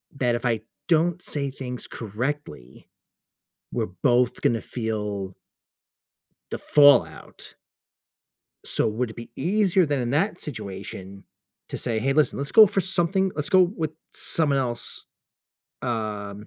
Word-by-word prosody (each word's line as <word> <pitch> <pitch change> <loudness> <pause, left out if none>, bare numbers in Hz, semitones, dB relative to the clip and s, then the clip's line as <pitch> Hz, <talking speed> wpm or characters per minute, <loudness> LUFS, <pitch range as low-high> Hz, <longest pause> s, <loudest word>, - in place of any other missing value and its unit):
that 125 -3 +1
if 120 - -4
I 115 -3 +1 0.3
don't 170 +1 +2
say 140 -5 -2
things 125 -2 -6
correctly, 115 - -5 0.9
we're - - -1
both 125 -2 +3
gonna 115 -2 +1
feel 105 -5 -4 1.2
the - - -2
fallout. 145 -3 +3 1.1
So, - - 0
would 110 +2 -1
it - - -11
be 115 - -9
easier 190 -2 +2
than 145 -2 0
in 120 -1 -2
that 175 +6 +1
situation 100 -5 -7 0.4
to - - -5
say, 115 -3 -1
"Hey, 135 +4 +1
listen, 150 +1 +2
let's 140 0 -3
go 215 -1 +9
for 195 0 0
something 190 +1 +1
let's 150 -1 -3
go 185 -2 +6
with 170 -4 -1 0.2
someone 145 -4 +1
else," 120 -3 -3 0.8
um, 105 -4 -4
130 Hz, 130 wpm, -25 LUFS, 110-160 Hz, 1.2 s, go